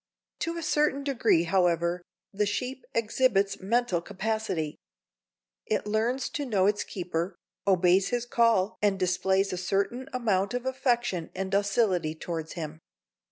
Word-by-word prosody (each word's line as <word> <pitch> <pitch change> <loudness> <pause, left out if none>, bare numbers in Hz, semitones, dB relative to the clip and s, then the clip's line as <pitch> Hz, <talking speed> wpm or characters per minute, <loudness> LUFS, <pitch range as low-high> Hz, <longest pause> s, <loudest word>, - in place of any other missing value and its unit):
To 335 0 -2
a 335 - -4
certain 295 -2 +1
degree, 235 - +3
however, 175 -1 +1 0.3
the 205 +1 +1
sheep 255 +6 -3
exhibits 225 -3 +2
mental 205 -3 +1
capacity. 195 -5 -3 0.9
It 435 - 0
learns 230 +5 0
to 290 - -3
know 200 -6 +2
its 205 +1 +2
keeper, 175 0 -3 0.3
obeys 185 0 +4
his 245 -1 -1
call 230 -4 +2
and 205 -2 +2
displays 190 +1 +1
a - - -2
certain 200 +8 -1
amount 215 -4 0
of 245 0 -3
affection 240 - 0
and 190 +1 -3
docility 195 -5 +1
towards 160 -1 -5
him. 155 -2 -6
200 Hz, 135 wpm, -28 LUFS, 180-240 Hz, 0.9 s, obeys